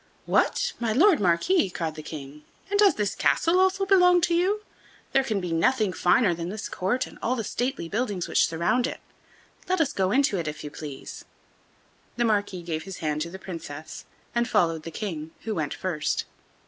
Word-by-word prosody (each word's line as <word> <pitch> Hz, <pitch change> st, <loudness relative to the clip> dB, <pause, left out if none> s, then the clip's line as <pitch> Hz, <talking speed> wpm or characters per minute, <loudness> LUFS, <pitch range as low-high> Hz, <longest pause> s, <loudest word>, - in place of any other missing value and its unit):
"What! -, -, +2 dB
my 235 Hz, -2 st, 0 dB
Lord 335 Hz, -, +5 dB
Marquis," 190 Hz, -, +2 dB
cried 165 Hz, -3 st, -3 dB
the 155 Hz, -, -8 dB
King, 150 Hz, -1 st, -9 dB, 0.3 s
"and 405 Hz, -, +1 dB
does 410 Hz, -2 st, +6 dB
this 205 Hz, -2 st, -1 dB
castle 340 Hz, +3 st, +2 dB
also 380 Hz, +1 st, +3 dB
belong 360 Hz, -2 st, +6 dB
to 340 Hz, -, +2 dB
you? 385 Hz, +5 st, +1 dB, 0.5 s
There 270 Hz, -, +4 dB
can 215 Hz, -6 st, -1 dB
be 180 Hz, -2 st, -4 dB
nothing 205 Hz, +4 st, +2 dB
finer 175 Hz, +3 st, +3 dB
than 170 Hz, +1 st, -4 dB
this 210 Hz, +2 st, -5 dB
court 245 Hz, +8 st, -1 dB
and -, -, -14 dB
all 250 Hz, -, 0 dB
the 225 Hz, -, -2 dB
stately 245 Hz, -5 st, -2 dB
buildings 205 Hz, -2 st, -2 dB
which -, -, +3 dB
surround 175 Hz, +10 st, +1 dB
it; -, -, -6 dB, 0.7 s
let 370 Hz, -1 st, +2 dB
us 300 Hz, -4 st, +1 dB
go 190 Hz, -1 st, +1 dB
into 250 Hz, -4 st, +2 dB
it, 165 Hz, -, -3 dB
if 150 Hz, 0 st, -5 dB
you 150 Hz, -, -6 dB
please." 145 Hz, -2 st, -8 dB, 0.9 s
The 240 Hz, -, +1 dB
Marquis 205 Hz, -5 st, 0 dB
gave 160 Hz, -2 st, -3 dB
his 190 Hz, +2 st, -8 dB
hand 150 Hz, -1 st, -2 dB
to 170 Hz, -, -2 dB
the 190 Hz, -, -8 dB
Princess, 160 Hz, -5 st, -8 dB, 0.3 s
and 235 Hz, 0 st, 0 dB
followed 165 Hz, -7 st, +2 dB
the 165 Hz, -, -7 dB
King, 165 Hz, -4 st, -5 dB
who 220 Hz, -, -3 dB
went 155 Hz, -6 st, -2 dB
first. 160 Hz, -6 st, -1 dB
195 Hz, 195 wpm, -26 LUFS, 165-260 Hz, 0.9 s, does